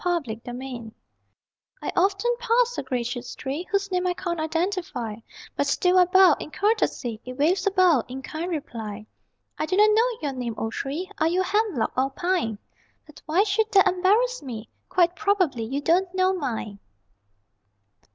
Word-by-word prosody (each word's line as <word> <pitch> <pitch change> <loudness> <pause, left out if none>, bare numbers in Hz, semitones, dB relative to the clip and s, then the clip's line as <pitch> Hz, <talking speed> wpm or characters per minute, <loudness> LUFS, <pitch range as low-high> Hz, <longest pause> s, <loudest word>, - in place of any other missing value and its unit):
TIT 300 - -1
FOR 245 - -7
TAT 245 -3 -7 0.9
I - - -2
often 395 +6 +2
pass 485 0 +2
a - - -2
gracious 245 -1 -4
tree 290 +7 -4
Whose 400 -1 0
name 365 0 0
I 360 - 0
can't 345 -3 -3
identify, 325 - -2 0.4
But 285 - 0
still 360 +5 +3
I 360 - +7
bow, 375 +1 +6
in - - -7
courtesy 305 - 0
It 255 - -7
waves 345 +8 +2
a - - +3
bough, 360 - +4
in 260 +2 -7
kind 320 +5 -4
reply. 220 - -5 0.5
I 310 - -1
do 370 - 0
not 425 +1 +6
know 465 +2 +2
your 285 -2 -1
name, 245 -3 -4
O 225 - -2
tree 320 - -4
(Are 315 - +3
you 355 +3 +1
a - - -1
hemlock 395 - 0
or 260 +1 +2
a - - -9
pine?) 335 - -1 0.5
But 300 - -16
why 340 +6 +3
should 435 +1 0
that 390 -1 +6
embarrass 410 +8 +2
me? 235 -5 -7 0.2
Quite 350 -1 +3
probably 370 - +1
you 270 +5 -3
don't 350 +4 +2
know 375 0 +3
mine. 230 - -4
345 Hz, 180 wpm, -25 LUFS, 260-385 Hz, 0.9 s, I